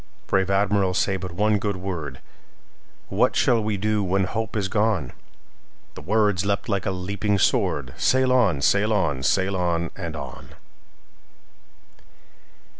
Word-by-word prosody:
Brave 95 -1 +1
Admiral, 100 -1 +1
say 95 - +1
but 95 -1 -5
one 105 +4 +1
good 100 0 -2
word:What 85 -8 -5
shall 115 -2 +3
we 105 -1 -1
do 105 +1 0
when 95 +1 +1
hope 110 +3 -3
is 100 -3 0
gone?"The 105 - -5
words 105 +2 +1
leapt 100 0 -1
like 100 -3 -1
a - - +2
leaping 100 +2 -1
sword:"Sail 100 - +1
on! 100 - +2
sail 100 +6 +3
on! 80 -10 0
sail 95 +7 +1
on! 85 -2 -1
and - - -6
on!" - - -9
100 Hz, 125 wpm, -24 LUFS, 90-105 Hz, -, shall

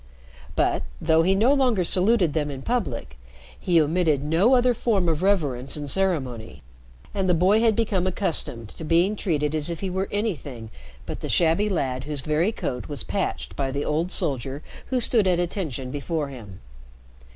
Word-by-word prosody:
But, - - +1 0.2
though 160 0 +3
he 190 +3 +3
no 230 +8 +4
longer 250 -9 +2
saluted 185 -2 +3
them 150 -2 -1
in 135 -2 -7
public, 125 - -3 0.4
he 175 -2 +3
omitted 155 -2 +1
no 175 - +3
other 250 0 +3
form 210 -6 0
of 160 -1 0
reverence 145 -10 0
and 145 -1 -5
ceremony, 130 - -1 0.5
and 190 -2 -1
the 180 - +4
boy 190 +6 +4
had 225 -2 +3
become 200 -5 0
accustomed 155 - -1
to 160 - -10
being 170 +6 +2
treated 150 -7 -1
as 155 0 +1
if 170 - -5
he 190 -2 -3
were 190 +1 -1
anything 145 - -4 0.3
but - - -6
the - - -6
shabby 170 +5 +2
lad 135 -8 -2
whose 150 -2 -4
very 155 +8 +1
coat 125 - -4
was 145 -2 -4
patched 195 - -3
by 135 -1 -1
the 140 +2 -3
old 165 +4 -1
soldier 135 +1 -1 0.2
who 255 - 0
stood 225 -4 +3
"at 180 -1 +2
attention" 155 - -3
before 145 +1 -3
him. 105 -8 -11
165 Hz, 175 wpm, -24 LUFS, 140-195 Hz, 0.5 s, no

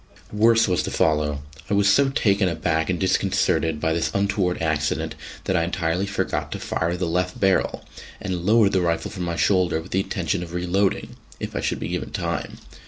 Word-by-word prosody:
Worse 115 +1 +4
was 90 -4 +1
to - - -3
follow. 75 -2 +1 0.3
I 100 - +2
was 100 0 +3
so 135 +7 +4
taken 100 -7 +2
aback 80 -1 -1
and 90 - 0
disconcerted 90 -4 +1
by 80 +1 +1
this 85 0 0
untoward 100 -2 +1
accident 75 -2 -1 0.3
that - - 0
I 85 - +2
entirely 85 +2 -1
forgot 100 - -2
to - - -5
fire 85 +2 -1
the 90 - -1
left 90 +2 -1
barrel, 95 -1 +1 0.3
and 90 -3 -3
lowered 105 +1 +4
the 95 - +2
rifle 85 -1 -1
from 90 -2 -4
my 85 -1 -2
shoulder 90 -3 +2
with 85 +3 -11
the 95 - +1
intention 95 -2 -2
of 85 -1 -7
reloading 90 +3 0 0.2
if - - -5
I - - -1
should - - -1
be - - -4
given - - -3
time. - - -3
90 Hz, 195 wpm, -23 LUFS, 85-100 Hz, 0.3 s, Worse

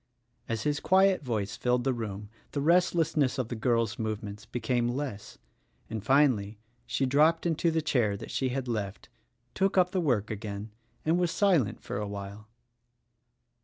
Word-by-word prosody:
As 115 -1 -2
his 145 0 0
quiet 190 0 +4
voice 110 -6 -2
filled 125 0 +1
the 135 - +1
room 105 -3 -5 0.2
the 145 - -1
restlessness 160 -3 +2
of 125 -3 -2
the 120 - -3
girl's 115 0 0
movements 110 -1 -4
became 120 0 0
less, 120 -5 -4 0.5
and 110 -3 -4
finally 115 -6 +3 0.3
she 135 - 0
dropped 155 +6 +3
into 170 0 +1
the 160 -1 0
chair 115 -9 +1
that 110 - -8
she 130 - 0
had 130 0 -3
left, 105 -5 -4 0.4
took 195 0 +1
up 180 -1 +4
the 190 -2 0
work 115 -10 +1
again, 105 0 -5 0.3
and 165 +3 +3
was 175 -1 +2
silent 165 - +2
for - - -4
a 105 0 -3
while. 100 +1 -7
125 Hz, 165 wpm, -29 LUFS, 105-155 Hz, 0.5 s, quiet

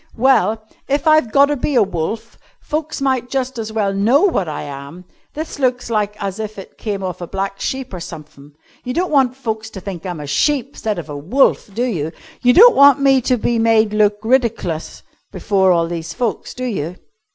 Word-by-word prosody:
Well, 225 -3 +2 0.2
if 285 +4 0
I've 310 -7 +4
gotter 280 +3 +4
be 285 +1 -2
a 235 - +6
wolf 190 +3 -4 0.2
folks 305 -1 -4
might 260 -2 0
just 260 -2 -2
as 220 -1 -4
well 210 -3 0
know 225 - +3
what 200 - +1
I 150 - -5
am. 140 +5 -9 0.3
This 310 -1 -6
looks 250 -2 0
like 210 -2 0
as 195 0 -4
if 215 -1 -5
it 195 - -10
came 200 -3 -3
off 180 -1 -5
a 175 - -5
black 195 +1 -4
sheep 260 -4 -4
or 180 - -5
sumthin'. 150 -4 -11 0.3
You 250 0 -4
don't 360 +1 0
want 265 -4 +3
folks 220 -4 -4
to 205 - -8
think 185 -2 -7
I'm 175 -3 -5
a 150 - -6
sheep 270 - 0
'stead 215 -2 -3
of 165 -3 -6
a 145 - -7
wolf, 210 - +1
do 240 - 0
you? 165 -10 -2 0.3
You 245 - +5
don't 465 - +8
want 280 0 +7
me 270 -1 +4
to 250 +1 +1
be 235 +1 0
made 225 -1 +3
look 210 -1 +3
ridiclus 225 -9 -1 0.3
before 190 -2 +2
all 170 -1 +3
these 165 -1 -5
folks, 240 -4 -3
do 255 - -6
you?" 180 -8 -3
220 Hz, 205 wpm, -18 LUFS, 185-260 Hz, 0.3 s, don't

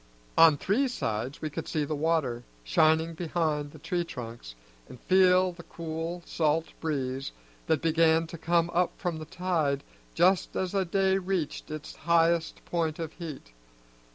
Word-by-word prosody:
On 160 -3 +7
three 225 - +1
sides 125 - -3
we 155 - -2
could - - -5
see 150 -2 -1
the 155 - -3
water, 145 -6 0 0.2
shining 160 - +3
behind 155 -3 -1
the 155 - -13
tree 170 +3 -2
trunks, 115 - -8 0.3
and 125 - -11
feel 185 0 +4
the 175 0 -11
cool 165 +1 -5
salt 160 0 +1
breeze 135 -4 -2 0.4
that 160 -1 +1
began 165 0 +4
to 165 +1 -8
come 170 +1 +1
up 175 +1 +2
with 170 -3 -1
the 155 - -7
tide 165 -6 -1 0.3
just 180 +2 +3
as 185 -1 -1
the 195 -2 +1
day 190 +2 +2
reached 180 -5 -3
its 155 -1 -7
highest 165 0 +2
point 165 -3 -1
of 160 -2 -5
heat. 150 - -8
165 Hz, 155 wpm, -28 LUFS, 150-175 Hz, 0.4 s, On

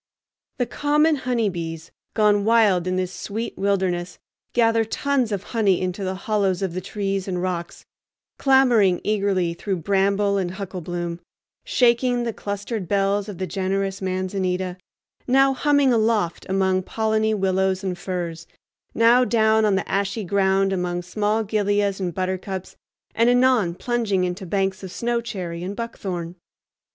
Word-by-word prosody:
The 250 - +1
common 300 +5 +2
honeybees, 175 - -2 0.2
gone 210 -2 +3
wild 210 -5 +3
in 185 - 0
this 185 0 -2
sweet 220 +3 -5
wilderness, 185 -3 -1 0.3
gather 230 -1 +3
tons 255 +1 0
of 200 -2 -2
honey 205 -5 +3
into 185 +2 -3
the 190 0 -2
hollows 195 -2 0
of 185 -3 -2
the 185 - -3
trees 195 -1 -3
and 180 -2 -2
rocks, 175 -1 -4 0.5
clambering 245 -9 +4
eagerly 195 -5 +1
through 195 +3 -3
bramble 200 +3 +1
and 180 -1 -2
hucklebloom, 175 -3 -5 0.5
shaking 245 - +2
the 230 -1 -2
clustered 205 -1 -4
bells 200 +2 +1
of 200 - -7
the 185 - -2
generous 195 +2 -2
manzanita, 185 -1 -2 0.5
now 270 +1 +4
humming 285 -1 +3
aloft 220 -6 +1
among 190 -1 +2
polleny 220 +2 0
willows 190 -1 0
and 185 -2 -2
firs, 170 -3 -4 0.5
now 235 +2 +5
down 220 -2 +3
on 205 -2 +3
the 190 - -2
ashy 200 +2 -1
ground 195 0 +2
among 175 -1 -2
small 210 +4 0
gilias 205 -1 0
and 180 -3 -3
buttercups, 185 0 -4 0.4
and 230 +1 +3
anon 245 -8 +3
plunging 225 -5 0
into 180 +1 -3
banks 195 +1 -1
of 190 -2 -7
snowy 235 +2 -1
cherry 185 -7 -5
and 190 +3 -4
buckthorn. 185 -7 -5
195 Hz, 145 wpm, -23 LUFS, 185-220 Hz, 0.5 s, now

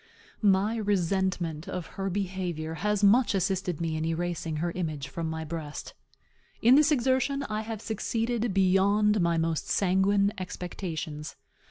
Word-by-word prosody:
My 205 +2 +3
resentment 185 -5 0
of 180 -2 -4
her 195 0 -2
behavior 180 -4 -3
has 210 0 +1
much 220 +2 +5
assisted 190 -3 -1
me 165 -2 -1
in 155 - -2
erasing 165 0 -2
her 170 +3 -1
image 155 -6 -3
from 160 +3 -4
my 160 0 -4
breast. 155 -2 -6 0.7
In 240 +3 +6
this 300 +2 +5
exertion 265 +1 +1
I 215 -4 -3
have 220 -1 -6
succeeded 230 +1 -1
beyond 195 +2 +3
my 170 -1 +2
most 165 -1 -1
sanguine 200 +2 +2
expectations. 170 -4 -5
190 Hz, 140 wpm, -28 LUFS, 165-210 Hz, 0.7 s, In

